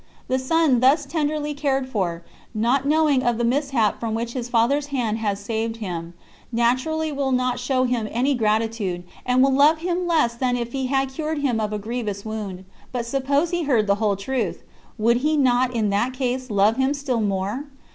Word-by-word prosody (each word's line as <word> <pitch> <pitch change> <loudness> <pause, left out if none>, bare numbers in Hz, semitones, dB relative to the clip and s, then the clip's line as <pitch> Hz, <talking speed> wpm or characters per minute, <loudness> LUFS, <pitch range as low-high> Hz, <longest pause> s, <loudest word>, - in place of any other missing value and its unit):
The 260 - +1
son, 285 -1 +2
thus 275 +4 +4
tenderly 300 0 -1
cared 275 -2 -1
for, 180 -8 -2 0.3
not 245 +6 +1
knowing 300 -3 +3
of 240 -2 +1
the 240 - -1
mishap 250 -3 +1
from 225 -1 -2
which 235 +1 -3
his 245 -2 -4
father's 255 +5 +2
hand 235 -6 -1
has 205 -2 -1
saved 225 +2 -2
him, 175 -5 -5 0.4
naturally 255 +7 +1
will 275 -2 -1
not 250 -1 +1
show 255 +1 +1
him 245 -4 0
any 255 +5 +1
gratitude, 215 -5 0 0.2
and 250 +1 +4
will 270 0 +3
love 290 +4 +5
him 350 +2 -2
less 310 -9 +2
than 245 +1 0
if 235 -1 -4
he 265 0 -2
had 270 0 +1
cured 310 +3 -3
him 245 -5 +1
of 215 -1 -1
a 210 - -2
grievous 210 -2 -4
wound. 205 -4 -5 0.3
But 245 -2 -3
suppose 280 +6 0
he 345 -2 -1
heard 240 -7 +2
the 200 0 +2
whole 210 -2 +2
truth, 215 +1 -3 0.3
would 235 +2 +3
he 305 +4 +1
not 255 -2 +3
in 220 -4 0
that 235 +6 0
case 255 0 -2
love 210 +2 +3
him 265 +2 +1
still 265 -5 -1
more? 205 +6 -2
250 Hz, 195 wpm, -23 LUFS, 220-275 Hz, 0.4 s, love